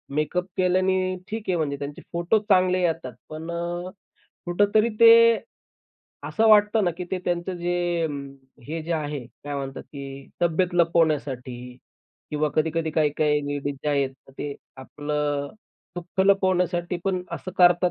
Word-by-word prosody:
makeup 155 +4 0
केल्याने, 185 0 +2
ठीक 220 0 -4
आहे 185 - +2
म्हणजे 145 -3 -1
त्यांचे 145 0 -6
फोटो 175 +6 +2
चांगले 185 -1 +4
येतात, 165 -7 -1 0.2
पण 155 +2 -7
अ, 175 +1 -3 0.6
कुठेतरी 205 +5 +3
ते 230 0 +10 1.2
असं 225 0 +2
वाटतं 210 0 +5
ना 175 - +2
की 180 - -4
ते 190 - -1
त्यांचं 175 +1 -1
जे 175 -1 -1
अं, 145 -3 -4 0.4
हे 160 +1 -3
जे 170 +2 -3
आहे 150 -3 -2 0.2
काय 145 0 -4
म्हणतात 135 -1 -5
की 140 -1 -9
तब्येत 175 +2 +1
लपवण्यासाठी, 140 -7 0 0.5
किंवा 150 0 0
कधी-कधी 160 +1 0
काही-काही 150 -1 +2
लेडीज 145 0 -2
जे - - +1
आहेत 140 -2 +1 0.2
तर - - -15
ते 145 -1 -4 0.2
आपलं 145 +1 -3 0.5
दुःख 175 +2 -3
लपवण्यासाठी 180 -2 +2
पण 185 -2 0
असं 185 - -5
करतात 175 0 +5
170 Hz, 145 wpm, -25 LUFS, 145-180 Hz, 1.2 s, ते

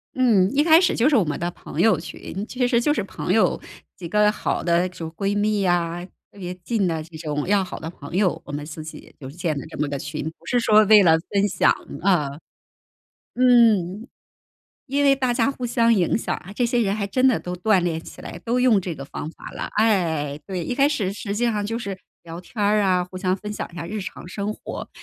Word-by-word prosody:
嗯， 220 -7 +4
一 295 - +4
开 325 +1 +6
始 360 - +2
就 245 +4 +3
是 300 - +3
我 210 - +4
们 150 -3 -3
的 175 +1 -2
朋 - - -9
友 220 -7 +4
群， 190 +4 -7
其 250 -1 0
实 240 -1 +2
就 295 +4 +2
是 - - -1
朋 - - -4
友， - - +2 0.3
几 175 -3 -7
个 210 +1 +4
好 - - -2
的 175 +1 +2
主 165 -3 -7
闺 200 +4 -2
蜜 210 0 +1
呀， 175 -1 0 0.3
特 200 - -16
别 180 -1 -5
近 210 -4 0
的 160 -2 -2
这 165 0 -14
种 150 0 -3
要 200 -1 +3
好 180 - -7
的 160 - -6
朋 145 +1 -9
友， 190 -2 +1
我 - - -8
们 145 +1 -4
自 155 0 -8
己 155 - -11
就 130 -2 -8
建 165 0 -3
了 135 - -4
这 - - -9
么 150 0 0
个 140 -1 -4
群， 145 +2 -5 0.2
不 - - -22
是 245 - +2
说 215 -2 +5
为 210 -1 +7
了 165 -2 +6 0.2
分 200 0 +2
享， 190 -3 +3 0.3
啊。 175 -7 +2 1.1
嗯。 230 -4 +4 0.8
因 285 +2 0
为 275 -1 +6
大 255 -3 0
家 235 +2 +2
互 250 -3 -5
相 230 -1 +3
影 185 -3 +2
响 - - -2
啊， 185 - -9
这 245 - 0
些 240 0 +1
人 200 -1 0
还 200 -2 -2
真 255 +6 +3
的 250 - +2
都 180 0 -5
锻 195 +2 +3
炼 165 -2 -1
起 - - -12
来， - - -8
都 240 +2 0
用 245 -6 +4
这 175 -3 -4
个 140 - -8
方 145 +2 -6
法 - - -11
了。 - - -5
哎， 160 -9 +1
对， 185 -4 -4
一 245 - -2
开 280 +2 +4
始 200 -10 -1
实 200 0 -5
际 240 - 0
上 210 -3 0
就 225 +2 -3
是 200 -5 -5 0.2
聊 170 +1 -8
天 185 - -20
儿 210 +1 +3
啊， 185 -2 +2
互 185 0 -9
相 185 0 0
分 210 +2 -6
享 - - -5
一 175 - -14
下 165 - -5
日 210 +3 -4
常 185 - -8
生 200 +3 -4
活， - - -7
195 Hz, 260 characters per minute, -23 LUFS, 170-230 Hz, 1.1 s, 为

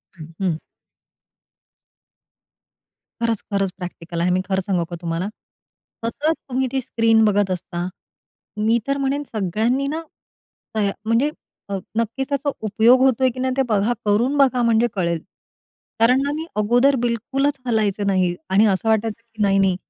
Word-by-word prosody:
अहं 165 +1 -3 2.6
खरंच, 230 -2 0
खरंच. 195 -1 +1
प्रॅक्टिकल 175 -2 -6
आहे. 175 - +2
मी 185 +1 +2
खरं 190 0 +1
सांगू 180 -4 +1
का 175 - -5
तुम्हाला, 170 +2 -2 0.8
सतत 295 +7 0 0.2
तुम्ही 260 +1 0
ती 265 0 0
स्क्रीन 225 -2 +3
बघत 205 -2 +2
असता, 175 -1 -3 0.8
मी 230 +2 +4
तर 275 0 +1
म्हणेन 275 +1 -1
सगळ्यांनी 220 +7 0
ना, 320 - -3 0.7
तया 205 -2 +1
म्हणजे 230 +7 +2 0.4
अ, 200 - -1 0.2
नक्कीच 230 +4 -1
त्याचा 285 0 0 0.2
उपयोग 225 +5 +5
होतोय, 260 0 +4
की 255 - -8
नाही 260 0 0
ते - - +4
बघा. 215 +2 +2
करून 235 +7 +2
बघा, 265 -3 +4
म्हणजे 230 0 +3
कळेल. 170 -3 0 0.8
कारण 250 +4 +5
ना, 285 - 0
मी 320 +1 -4 0.2
अगोदर 245 +6 +4
बिलकुलच 270 +5 0
हलायचं 210 -4 0
नाही 185 -3 +2
आणि 195 +3 +5
असं 205 +4 -1
वाटायचं, 220 0 0
की 220 - -5
नाही, 195 -1 +3
नाही, 190 -2 +3
220 Hz, 150 wpm, -21 LUFS, 195-255 Hz, 2.6 s, उपयोग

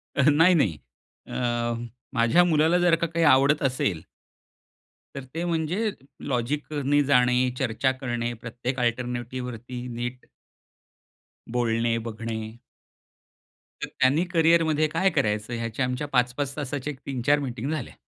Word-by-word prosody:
अ, - - +2
नाही, 165 +5 +5
नाही. 95 - +2 0.5
अह, 120 -1 -2 0.3
माझ्या 120 +9 +4
मुलाला 160 0 +3
जर 175 -1 +4
का 170 0 -1
काही 165 0 0
आवडत 140 +1 +5
असेल 105 -11 0 1.1
तर 140 - -5
ते 170 - -2
म्हणजे 170 +6 0 0.4
लॉजिकने 145 +3 0
जाणे, 125 -2 +3
चर्चा 130 0 +1
करणे, 120 -3 -3
प्रत्येक 120 +2 -4
अल्टरनेटिव्हवरती 125 0 -3
नीट 120 +1 -5 1.2
बोलणे 115 -1 +1
बघणे. 110 0 -5 1.3
तर - - -2
त्यांनी 140 +7 +2
करिअरमध्ये 160 -2 +3
काय 165 +5 +1
करायचं 105 -2 -1
ह्याच्या 115 +2 -2
आमच्या 125 +4 -3
5-5 135 +1 0
तासाच्या 145 0 -3
एक 130 - -17
3-4 140 +2 +1
मीटिंग 130 0 -4
झाल्या. 155 -6 -4
130 Hz, 120 wpm, -25 LUFS, 120-150 Hz, 1.3 s, नाही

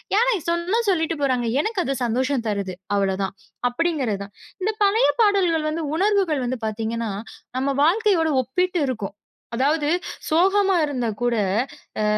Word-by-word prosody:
யாருனாய் 435 -7 +2
சொன்னா 350 +7 +1
சொல்லிட்டு 325 -3 +1
போறாங்க. 255 -3 +1 0.2
எனக்கு 435 +1 -1
அது 275 - -1
சந்தோஷம் 255 +1 0
தருது, 200 -3 -2 0.2
அவ்வளோதான். 195 0 0 0.3
அப்படீங்கிறதுதான். 245 - -1 0.3
இந்தப் 430 +3 -1
பழய 435 +5 +4 0.2
பாடல்கள் 355 -7 +2
வந்து 325 +2 -2 0.2
உணர்வுகள் 380 -7 +2
வந்து 255 +1 -2
பாத்தீங்கன்னா, 225 +1 -2 0.5
நம்ம 270 +2 0
வாழ்க்கயோடு 345 -2 +3
ஒப்பிட்டு 360 +8 0
இருக்கும். 255 -3 -2 0.6
அதாவது 290 +4 +1 0.4
சோகமா 385 +4 +3
இருந்தா 255 -5 -2
கூட 240 -1 +2 0.7
அ - - +1
310 Hz, 130 wpm, -23 LUFS, 240-375 Hz, 0.7 s, பழய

